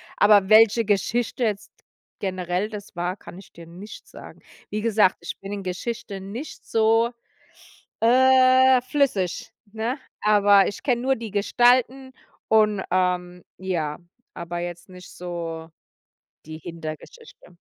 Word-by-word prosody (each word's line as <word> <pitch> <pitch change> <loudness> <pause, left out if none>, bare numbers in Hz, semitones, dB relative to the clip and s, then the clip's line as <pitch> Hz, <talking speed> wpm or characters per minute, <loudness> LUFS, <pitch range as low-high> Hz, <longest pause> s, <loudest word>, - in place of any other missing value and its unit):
Aber 205 -2 +5
welche 220 +2 +5
Geschichte 225 +5 -1
jetzt 210 -3 -2 0.5
generell 185 +1 -2
das 205 -3 -10
war, 175 +2 -3
kann 180 - -12
ich 195 - -14
dir 170 - -13
nicht 185 +6 -12
sagen. - - -13 0.3
Wie 210 - -3
gesagt, 215 -4 +2
ich 170 - -7
bin 195 - -8
in 200 -1 -5
Geschichte 195 +2 -5
nicht 220 +10 -8
so, 225 +1 +2 0.9
äh, 260 +1 +5
flüssig, 250 - -1 0.2
ne? 230 +5 -3 0.2
Aber 205 -1 +5
ich 200 - -9
kenne 245 -3 0
nur 265 +1 +1
die 225 -2 -7
Gestalten 245 +5 +2 0.4
und, 210 -2 +3
ähm, 180 -1 -1
ja, 170 -6 -3 0.3
aber 170 0 -6
jetzt 175 0 -7
nicht 180 0 -13
so 165 -2 -6 0.8
die 155 0 -8
Hintergeschichte. 165 - -10
205 Hz, 130 wpm, -23 LUFS, 180-235 Hz, 0.9 s, Aber